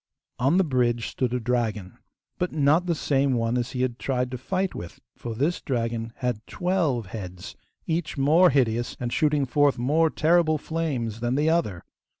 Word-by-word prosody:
On 135 +8 +3
the 190 - +5
bridge 120 -6 0
stood 125 -2 -2
a 125 - 0
dragon, 110 -5 -2 0.4
but 180 - -1
not 155 +4 +2
the 170 - +1
same 140 -2 +1
one 115 0 0
as 120 0 -2
he 125 -1 -1
had 125 -1 -2
tried 125 -2 -1
to 125 - -4
fight 185 +7 -1
with, 85 - -8 0.2
for 115 -2 -6
this 150 +9 0
dragon 115 -3 -2
had 125 -4 -2
twelve 170 - 0
heads, 90 -3 -8 0.3
each 160 -2 -2
more 160 +7 +5
hideous 120 -3 0
and 120 -1 -3
shooting 150 -2 +2
forth 145 +2 +2
more 150 +7 +2
terrible 160 0 +3
flames 140 -9 -3
than 120 +2 -1
the 150 +3 +2
other. 105 - 0
130 Hz, 175 wpm, -25 LUFS, 120-155 Hz, 0.4 s, the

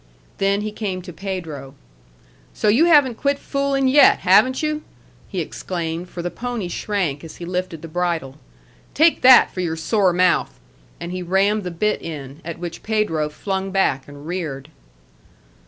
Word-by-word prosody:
Then 200 +1 +2
he 215 0 -3
came 195 -4 -4
to 180 -1 -9
Pedro. 160 -7 -6 0.8
"So 210 - +1
you 250 +11 +5
haven't 290 -8 +4
quit 280 0 +1
fooling 275 -1 0
yet, 280 +3 +6
haven't 260 +4 +4
you?" 305 0 -1 0.5
he - - -2
exclaimed, 170 -1 -4
for 175 - -6
the 175 - -3
pony 240 -7 -4
shrank 175 -6 -2
as 165 - -10
he 175 - -8
lifted 180 -2 -4
the - - -6
bridle. 165 -5 -2 0.6
"Take 320 +2 +4
that 255 -1 +7
for - - -6
your 170 -3 -1
sore 185 +4 +2
mouth!" 180 0 +1 0.4
and 170 +1 -6
he 185 0 -4
rammed 195 +4 +1
the 180 - -3
bit 210 +5 -1
in, 145 -2 -8
at 170 0 -6
which 170 -1 -7
Pedro 210 -9 0
flung 190 +4 -3
back 185 -9 0
and 145 0 -12
reared. 155 -5 -5
185 Hz, 165 wpm, -21 LUFS, 165-215 Hz, 0.8 s, that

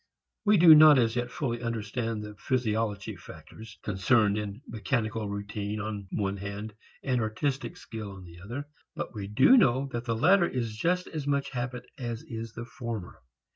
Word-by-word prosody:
We 210 0 +5
do 165 -2 +9
not 155 -1 +9
as 115 -2 +2
yet 120 0 -1
fully 120 -3 -3
understand 115 -1 -3
the 105 0 -8
physiological 110 -3 -2
factors 100 +6 -12
concerned 105 +1 +2
in 105 +4 -5
mechanical 110 -1 -2
routine 100 +1 -4
on 105 -2 -5
one 100 -1 -1
hand 100 +2 -6 0.3
and 125 -3 +1
artistic 120 +3 -2
skill 110 -3 -7
on 95 -1 -11
the 85 0 -13
other, 120 +9 -6 0.3
but - - -5
we 100 -3 -5
do 110 - +6
know 135 - +3
that 120 -1 -4
the 115 -2 0
latter 175 - +5
is 115 -4 -3
just 180 +10 0
as 150 -3 -5
much 140 -1 0
habit 125 -1 -4
as 120 -3 -4
is 115 -1 -7
the 120 - -6
former. 115 -6 -6
115 Hz, 175 wpm, -28 LUFS, 105-130 Hz, 0.3 s, do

